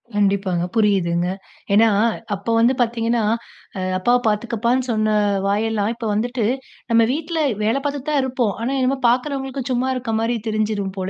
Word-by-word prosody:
கண்டிப்பாங்க 195 -3 +1
புரியுதுங்க. 180 -5 +2 0.4
ஏன்னா 220 +3 +6 0.5
அப்போ 200 +4 -4
வந்து 235 +3 +4
பார்த்தீங்கன்னா 230 -1 +1 0.6
அ - - -2 0.2
"அப்பாவ 240 +6 +3
பார்த்துக்கப்பானு" 235 +4 0
சொன்ன 215 -1 +1 0.4
வாயெல்லாம், 210 +1 0
இப்போ 225 -2 -4
வந்துட்டு 240 +1 -1 0.5
நம்ம 230 0 +5
வீட்ல 325 +2 -3 0.2
வேலை 220 +5 +2
பார்த்துக்கிட்டு 285 +1 -3
தான் 285 - +3
இருப்போம். 250 -5 0
ஆனா 245 - -1
என்னமோ 260 +1 +1
பார்க்கிறவங்களுக்கு 265 0 -2
சும்மா 255 +1 0
இருக்க 240 -3 -3
மாரி 230 +1 0
தெரிஞ்சுறும் 210 -3 -1
போல 185 0 -2
230 Hz, 145 wpm, -21 LUFS, 210-255 Hz, 0.6 s, ஏன்னா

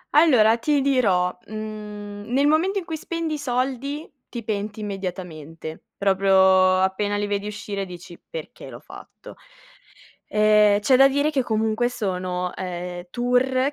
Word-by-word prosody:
Allora 240 -8 +5
ti 290 +1 +1
dirò, 200 -10 +2
mhmm, 210 -1 -7
nel 275 +3 +3
momento 335 +7 +2
in 370 - -3
cui 320 -3 -4
spendi 330 -2 -3
i - - -2
soldi, 270 +3 -2 0.2
ti 235 -2 -6
penti 210 0 -4
immediatamente. 175 -6 -6
Proprio 190 -1 +4
appena 205 +2 0
li 205 - -1
vedi 205 0 -2
uscire 205 -1 -4
dici: 175 -1 -11
"Perché - - -8
l'ho - - -10
fatto?" - - -13 0.9
Ehm, 210 -1 +4
c'è 255 +5 +4
da 270 +1 +7
dire 285 +2 +1
che, 280 -4 +1
comunque, 220 +1 0
sono, 180 -5 -3
ehm, 180 -1 -5
tour 255 +3 +1
215 Hz, 140 wpm, -23 LUFS, 190-265 Hz, 0.9 s, da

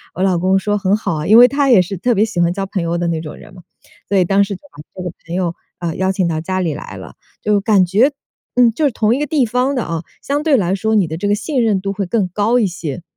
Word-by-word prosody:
我 185 - -1
老 185 -3 +2
公 190 +2 +2
说： 205 +2 -1
“很 200 0 +1
好 195 -5 -3
啊。” 150 0 -4
因 220 - +8
为 245 +1 +9
他 275 +1 0
也 235 -6 +7
是 180 +2 -4
特 240 +7 +1
别 210 +2 +3
喜 205 -6 -2
欢 170 0 +2
交 195 +1 -3
朋 195 -1 -3
友 170 +1 -1
的 175 0 -1
那 165 -1 -1
种 155 -2 -8
人 - - -15
嘛。 180 - -13 0.5
所 200 - +2
以 185 - +4
当 195 +3 +3
时 200 0 -4
就 - - -14
把 145 - -12 0.2
这 185 - -5
个 180 - -4 0.2
朋 170 - -4
友， 175 -2 -1 0.2
呃， 170 -2 -3
邀 190 0 +1
请 185 -2 0
到 160 -2 -2
家 185 +3 -2
里 165 -4 -1
来 145 - -8
了。 - - -11 0.3
就 210 -1 +1
感 200 -3 +3
觉， 215 +11 +3 0.4
嗯， 245 -2 +5
就 275 +8 -3
是 280 - +2
同 220 0 +1
一 - - -3
个 295 - -2
地 280 -3 +2
方 250 +4 0
的 250 - -1
啊， 165 -1 -4 0.2
相 285 +2 -2
对 300 -4 +3
来 190 -3 0
说 220 +2 0
你 195 -5 +3
的 160 - -5
这 205 - -2
个 205 - +3
信 260 +3 -1
任 210 -4 +2
度 195 +1 -3
会 200 0 -3
更 190 +1 0
高 210 +6 +1
一 215 - +2
些。 170 -4 -6
195 Hz, 325 characters per minute, -17 LUFS, 175-225 Hz, 0.5 s, 为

